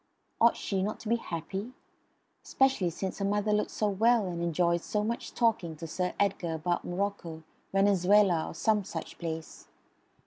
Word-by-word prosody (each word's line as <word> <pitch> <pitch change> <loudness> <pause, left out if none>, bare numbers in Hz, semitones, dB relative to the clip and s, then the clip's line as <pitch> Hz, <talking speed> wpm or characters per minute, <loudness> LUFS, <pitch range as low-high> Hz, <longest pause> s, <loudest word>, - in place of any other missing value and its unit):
Ought 235 +1 +5
she 195 -2 -2
not 210 +3 -2
to - - -8
be 235 - +3
happy? 195 +4 -5 0.7
Especially 265 -9 +2
since 190 +4 -5
her 200 - 0
mother 205 +1 +1
looked 210 - +1
so 215 - -1
well 220 +2 +3
and 170 -1 -4
enjoyed 170 0 +1
so 210 +3 -1
much 230 +2 -3
talking 215 -9 +1
to 165 +2 -8
Sir 180 +3 -2
Edgar 185 -5 0
about 175 +2 -1
Morocco, 175 -3 -3 0.3
Venezuela, 195 -2 +4
or - - -8
some 210 +3 +2
such 165 -4 -7
place. 160 -1 -6
195 Hz, 165 wpm, -29 LUFS, 170-210 Hz, 0.7 s, Ought